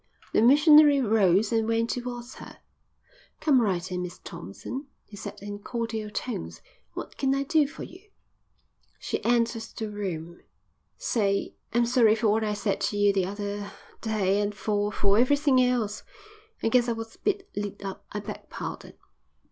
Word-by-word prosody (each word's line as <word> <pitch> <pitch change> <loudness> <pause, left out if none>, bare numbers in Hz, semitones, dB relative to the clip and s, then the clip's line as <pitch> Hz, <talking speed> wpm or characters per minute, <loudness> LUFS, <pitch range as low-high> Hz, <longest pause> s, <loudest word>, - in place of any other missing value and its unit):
The - - +4
missionary 295 +3 +7
rose 205 -3 +3
and 225 -1 +2
went 230 0 +1
towards 245 0 -5
her. - - -11 0.8
"Come 275 -5 +4
right 190 -4 -1
in, 180 0 -2
Miss 180 0 -6
Thompson," 255 - -8 0.2
he 210 - -13
said 200 - -7
in 205 0 -6
cordial 225 -1 -4
tones. 145 - -5 0.3
"What - - -8
can 270 0 +2
I 275 - 0
do 305 0 +3
for 280 - -9
you?" 380 +4 -13 0.9
She - - -4
entered 235 -1 +2 0.2
the 220 -1 -3
room. 175 -5 -5 0.6
"Say, 200 -4 0 0.2
I'm 240 +1 +3
sorry 235 -3 +4
for 220 -1 +1
what 220 +2 +2
I 210 -1 -1
said 205 -1 -1
to 205 - 0
you 205 0 +4
the 190 -2 +1
other 205 0 -4 0.3
day 205 -3 +1
an' 205 0 -1
for 205 0 -1
for 200 +1 +2
everythin' 280 +1 +4
else. 245 -5 +1 0.6
I - - +3
guess 245 +1 +3
I - - +2
was 225 0 -7
a - - -21
bit 395 -1 -1
lit 205 -1 -4
up. 195 - -6
I 210 - -4
beg 210 +1 -8
pardon." - - -7
220 Hz, 170 wpm, -27 LUFS, 205-245 Hz, 0.9 s, missionary